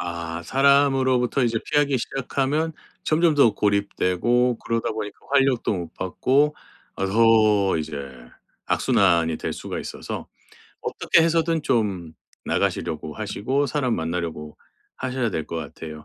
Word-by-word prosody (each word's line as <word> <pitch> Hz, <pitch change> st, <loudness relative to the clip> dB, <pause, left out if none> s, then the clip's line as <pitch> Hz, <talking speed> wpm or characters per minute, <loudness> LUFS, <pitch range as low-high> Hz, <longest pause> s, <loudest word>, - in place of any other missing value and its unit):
아 85 Hz, -1 st, -5 dB
사람으로부터 135 Hz, -, +3 dB
이제 115 Hz, -2 st, +1 dB
피하기 145 Hz, -2 st, +2 dB
시작하면 135 Hz, +5 st, -1 dB, 0.3 s
점점 160 Hz, 0 st, +2 dB
더 125 Hz, -7 st, +4 dB
고립되고 105 Hz, +4 st, +1 dB
그러다 115 Hz, 0 st, -2 dB
보니까 110 Hz, -1 st, -6 dB
활력도 135 Hz, -5 st, +2 dB
못 85 Hz, -3 st, -6 dB
받고 140 Hz, +10 st, +1 dB, 0.4 s
아 95 Hz, -, -1 dB
더 110 Hz, -2 st, +4 dB
이제 75 Hz, -1 st, -5 dB, 0.7 s
악순환이 85 Hz, -4 st, +2 dB
될 -, -, -4 dB
수가 -, -, -6 dB
있어서 -, -, -6 dB, 0.6 s
어떻게 170 Hz, -, +2 dB
해서든 165 Hz, -1 st, +1 dB
좀 95 Hz, -, -1 dB, 0.3 s
나가시려고 75 Hz, -, -2 dB
하시고 110 Hz, +6 st, -1 dB
사람 130 Hz, -4 st, 0 dB
만나려고 80 Hz, -2 st, -4 dB, 0.4 s
하셔야 130 Hz, -2 st, -2 dB
될 80 Hz, -6 st, -3 dB
것 85 Hz, -, -5 dB
같아요. 75 Hz, 0 st, -8 dB
115 Hz, 290 characters per minute, -23 LUFS, 90-135 Hz, 0.7 s, 더